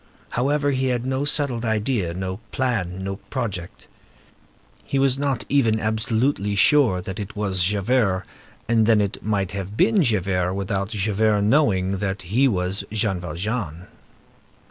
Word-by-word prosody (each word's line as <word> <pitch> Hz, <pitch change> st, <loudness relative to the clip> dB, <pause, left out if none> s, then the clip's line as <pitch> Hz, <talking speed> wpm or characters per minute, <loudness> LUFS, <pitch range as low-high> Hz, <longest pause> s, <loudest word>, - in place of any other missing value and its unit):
However, 145 Hz, +3 st, +1 dB
he 130 Hz, -1 st, 0 dB
had 125 Hz, -1 st, -1 dB
no 135 Hz, +2 st, -1 dB
settled 140 Hz, -5 st, 0 dB
idea, 110 Hz, -5 st, 0 dB
no 95 Hz, 0 st, -3 dB
plan, 95 Hz, -8 st, -1 dB
no 95 Hz, 0 st, -3 dB
project. 100 Hz, -9 st, -5 dB, 1.0 s
He 140 Hz, -, -2 dB
was 135 Hz, -1 st, +2 dB
not 140 Hz, -4 st, -1 dB
even 115 Hz, -6 st, +2 dB
absolutely 110 Hz, 0 st, 0 dB
sure 110 Hz, -3 st, +4 dB
that 95 Hz, +1 st, -6 dB
it 105 Hz, +1 st, -6 dB
was 95 Hz, -3 st, 0 dB
Javert, 100 Hz, 0 st, +1 dB, 0.4 s
and 115 Hz, -1 st, +3 dB
then 110 Hz, -2 st, +5 dB
it 100 Hz, -1 st, -2 dB
might 100 Hz, -3 st, -1 dB
have 100 Hz, +1 st, -5 dB
been 205 Hz, -, +4 dB
Javert, 95 Hz, -, +1 dB
without 100 Hz, 0 st, -2 dB
Javert 105 Hz, 0 st, +1 dB
knowing 100 Hz, -6 st, +2 dB
that 100 Hz, -1 st, -3 dB
he 115 Hz, +10 st, +2 dB
was 95 Hz, -3 st, -1 dB
Jean 105 Hz, -4 st, 0 dB
Valjean. 90 Hz, 0 st, -4 dB
105 Hz, 145 wpm, -23 LUFS, 95-125 Hz, 1.0 s, then